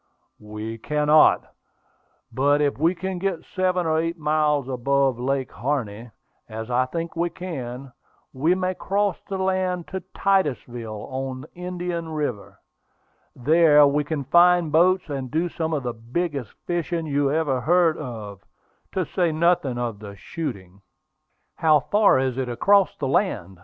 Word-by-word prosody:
"We 105 Hz, +2 st, -7 dB
cannot; 150 Hz, +4 st, +3 dB, 0.8 s
but 145 Hz, +2 st, +2 dB
if 145 Hz, -2 st, 0 dB
we 165 Hz, +4 st, +2 dB
can 185 Hz, +1 st, -4 dB
get 185 Hz, -3 st, -2 dB
seven 185 Hz, -1 st, 0 dB
or 160 Hz, 0 st, +2 dB
eight 165 Hz, +1 st, -2 dB
miles 150 Hz, -3 st, +1 dB
above 135 Hz, 0 st, +1 dB
Lake 135 Hz, +1 st, -1 dB
Harney, 120 Hz, -4 st, -3 dB, 0.4 s
as 110 Hz, +2 st, -6 dB
I 125 Hz, +1 st, +2 dB
think 165 Hz, +5 st, -5 dB
we 170 Hz, +1 st, 0 dB
can, 135 Hz, -7 st, -7 dB, 0.4 s
we 155 Hz, +7 st, +2 dB
may 185 Hz, 0 st, -1 dB
cross 200 Hz, 0 st, -1 dB
the 195 Hz, -, -2 dB
land 185 Hz, -2 st, -1 dB
to 190 Hz, -, -3 dB, 0.2 s
Titusville, 120 Hz, -, -1 dB
on 130 Hz, 0 st, -4 dB
Indian 175 Hz, -2 st, -4 dB
River. 145 Hz, -9 st, -4 dB, 0.8 s
There 150 Hz, +2 st, +5 dB
we 145 Hz, +1 st, +2 dB
can 145 Hz, -1 st, -3 dB
find 175 Hz, +3 st, +4 dB
boats, 180 Hz, +4 st, +3 dB
and 135 Hz, -4 st, -4 dB
do 160 Hz, +5 st, 0 dB
some 160 Hz, -1 st, -3 dB
of 150 Hz, -4 st, -1 dB
the 120 Hz, -1 st, -3 dB
biggest 130 Hz, -, -4 dB
fishing 170 Hz, -1 st, -2 dB
you 145 Hz, -2 st, +1 dB
ever 145 Hz, -5 st, 0 dB
heard 170 Hz, +2 st, +3 dB
of, 105 Hz, -8 st, -7 dB, 0.5 s
to 185 Hz, -2 st, 0 dB
say 175 Hz, +1 st, 0 dB
nothing 155 Hz, -5 st, +1 dB
of 120 Hz, -4 st, -3 dB
the 100 Hz, -1 st, -9 dB
shooting." 100 Hz, -, -7 dB, 0.8 s
"How 155 Hz, -2 st, +4 dB
far 200 Hz, +7 st, +3 dB
is 130 Hz, -1 st, -1 dB
it 130 Hz, -2 st, -2 dB
across 195 Hz, +11 st, +3 dB
the 135 Hz, -, -2 dB
land?" 100 Hz, -, -1 dB
150 Hz, 145 wpm, -23 LUFS, 125-175 Hz, 0.8 s, There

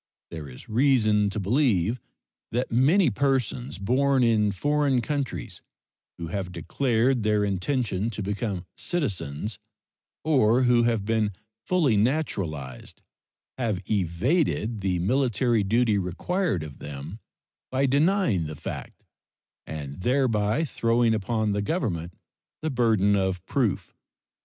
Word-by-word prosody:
There 80 Hz, -4 st, -7 dB
is 65 Hz, -, -12 dB
reason 110 Hz, -4 st, +3 dB
to 105 Hz, -, -3 dB
believe 110 Hz, -, +1 dB, 0.5 s
that 125 Hz, +3 st, -1 dB
many 140 Hz, -, +4 dB
persons 130 Hz, 0 st, -1 dB
born 130 Hz, +6 st, +2 dB
in 110 Hz, -3 st, +3 dB
foreign 140 Hz, +6 st, +1 dB
countries 140 Hz, +1 st, -3 dB, 0.6 s
who 85 Hz, -1 st, -6 dB
have 95 Hz, 0 st, -3 dB
declared 120 Hz, -, +1 dB
their 105 Hz, -1 st, +2 dB
intention 100 Hz, +1 st, -1 dB
to 105 Hz, -2 st, -5 dB
become 100 Hz, -2 st, -3 dB
citizens, 105 Hz, -, -3 dB, 0.6 s
or 130 Hz, -5 st, +3 dB
who 120 Hz, -1 st, +4 dB
have 115 Hz, -4 st, 0 dB
been 110 Hz, -2 st, +1 dB, 0.3 s
fully 155 Hz, -, +3 dB
naturalized, 100 Hz, -, -2 dB, 0.6 s
have 110 Hz, -7 st, 0 dB
evaded 110 Hz, -, 0 dB
the 95 Hz, -2 st, 0 dB
military 120 Hz, +2 st, +1 dB
duty 110 Hz, 0 st, +2 dB
required 95 Hz, -, -1 dB
of 75 Hz, -3 st, -10 dB
them 75 Hz, +8 st, -7 dB, 0.5 s
by 130 Hz, +1 st, +2 dB
denying 140 Hz, -, +2 dB
the 75 Hz, -, -6 dB
fact -, -, -7 dB, 0.6 s
and 75 Hz, 0 st, -6 dB
thereby 125 Hz, -, +1 dB
throwing 115 Hz, -3 st, +2 dB
upon 110 Hz, 0 st, 0 dB
the 100 Hz, 0 st, 0 dB
Government 100 Hz, -, -2 dB, 0.5 s
the 155 Hz, -, -1 dB
burden 110 Hz, -5 st, +3 dB
of 95 Hz, -2 st, -1 dB
proof. 120 Hz, -5 st, -1 dB
110 Hz, 120 wpm, -26 LUFS, 95-130 Hz, 0.6 s, many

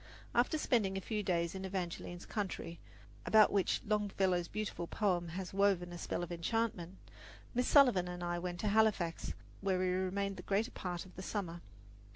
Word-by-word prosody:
After 245 Hz, +6 st, +3 dB
spending 210 Hz, -9 st, +1 dB
a -, -, 0 dB
few 210 Hz, +2 st, -2 dB
days 170 Hz, -4 st, 0 dB
in 190 Hz, 0 st, -5 dB
Evangeline's 175 Hz, -2 st, -4 dB
country, 190 Hz, -4 st, -4 dB, 0.4 s
about 215 Hz, -1 st, +6 dB
which 195 Hz, -2 st, +1 dB
Longfellow's 195 Hz, -4 st, +1 dB
beautiful 210 Hz, -4 st, -4 dB
poem 180 Hz, -4 st, 0 dB
has 190 Hz, -1 st, -5 dB
woven 190 Hz, -3 st, +2 dB
a -, -, -6 dB
spell 175 Hz, -, -2 dB
of 175 Hz, -, -6 dB
enchantment, 185 Hz, 0 st, -1 dB, 0.6 s
Miss 250 Hz, 0 st, +1 dB
Sullivan 245 Hz, -11 st, +6 dB
and 180 Hz, 0 st, -5 dB
I 175 Hz, 0 st, -1 dB
went 175 Hz, 0 st, -4 dB
to 210 Hz, -, +1 dB
Halifax, 200 Hz, -6 st, +2 dB, 0.2 s
where 195 Hz, -2 st, +1 dB
we 185 Hz, 0 st, +1 dB
remained 190 Hz, +2 st, -1 dB
the -, -, -6 dB
greater 215 Hz, +5 st, 0 dB
part 175 Hz, -1 st, -4 dB
of 185 Hz, -, -16 dB
the 185 Hz, -, -6 dB
summer. 180 Hz, -4 st, -4 dB
190 Hz, 175 wpm, -35 LUFS, 175-210 Hz, 0.6 s, about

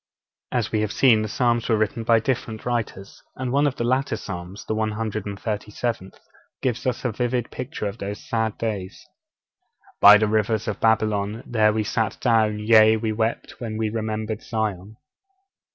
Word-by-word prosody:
As -, -, -1 dB
we 110 Hz, -, +1 dB
have 105 Hz, -1 st, -1 dB
seen, 115 Hz, -5 st, +4 dB
the 110 Hz, -, -2 dB
Psalms 120 Hz, +1 st, 0 dB
were 110 Hz, -, +3 dB
written 110 Hz, +2 st, -1 dB
by 115 Hz, 0 st, +4 dB
different 110 Hz, -2 st, -3 dB
writers, 110 Hz, -5 st, -4 dB
and 130 Hz, -1 st, -3 dB
one 140 Hz, +2 st, +3 dB
of 135 Hz, -, -2 dB
the -, -, -2 dB
later 130 Hz, +3 st, +1 dB
Psalms, 90 Hz, +1 st, -7 dB
the -, -, -2 dB
137th, 105 Hz, -1 st, -3 dB, 0.4 s
gives 125 Hz, -1 st, -2 dB
us 125 Hz, 0 st, -2 dB
a 125 Hz, -, +1 dB
vivid 120 Hz, +1 st, -2 dB
picture 125 Hz, -3 st, -5 dB
of 100 Hz, +3 st, -6 dB
those 100 Hz, +1 st, -6 dB
sad 110 Hz, -2 st, -1 dB
days: 100 Hz, -5 st, -4 dB, 1.0 s
'_By 105 Hz, 0 st, +10 dB
the 110 Hz, -, +2 dB
rivers 110 Hz, 0 st, 0 dB
of 105 Hz, -2 st, -3 dB
Babylon, 110 Hz, -1 st, +1 dB
there 110 Hz, -3 st, +3 dB
we 110 Hz, 0 st, 0 dB
sat 110 Hz, 0 st, -1 dB
down, 110 Hz, -3 st, +2 dB
yea, 110 Hz, 0 st, +5 dB
we 110 Hz, 0 st, -2 dB
wept, 110 Hz, +1 st, -2 dB
when 110 Hz, -3 st, -4 dB
we 110 Hz, -1 st, -1 dB
remembered 110 Hz, 0 st, -3 dB
Zion. 110 Hz, -2 st, -3 dB
110 Hz, 170 wpm, -23 LUFS, 105-115 Hz, 1.0 s, By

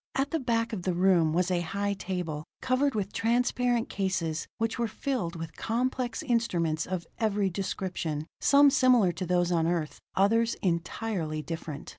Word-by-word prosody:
At 270 Hz, +1 st, 0 dB
the 325 Hz, -, 0 dB
back 230 Hz, -3 st, 0 dB
of 200 Hz, -, -3 dB
the 180 Hz, 0 st, -1 dB
room 175 Hz, -3 st, +4 dB
was 180 Hz, +3 st, +1 dB
a 180 Hz, -, +2 dB
high 200 Hz, +4 st, -1 dB
table, 180 Hz, -6 st, -4 dB, 0.2 s
covered 260 Hz, +1 st, +1 dB
with 205 Hz, -1 st, -2 dB
transparent 245 Hz, 0 st, +1 dB
cases 185 Hz, -5 st, -2 dB
which 225 Hz, +1 st, -1 dB
were 235 Hz, -, +1 dB
filled 220 Hz, -, -3 dB
with 165 Hz, -1 st, -7 dB
complex 245 Hz, +1 st, -1 dB
instruments 175 Hz, -10 st, 0 dB
of 180 Hz, -2 st, -3 dB
every 205 Hz, -3 st, +1 dB
description, 175 Hz, -5 st, -3 dB
some 285 Hz, 0 st, +6 dB
similar 250 Hz, -9 st, +5 dB
to 175 Hz, +2 st, -5 dB
those 175 Hz, 0 st, +2 dB
on 165 Hz, -2 st, +2 dB
Earth; 165 Hz, -3 st, -2 dB, 0.2 s
others 225 Hz, +4 st, +3 dB
entirely 170 Hz, -2 st, -2 dB
different. 160 Hz, -3 st, -6 dB
190 Hz, 160 wpm, -28 LUFS, 170-230 Hz, 0.2 s, some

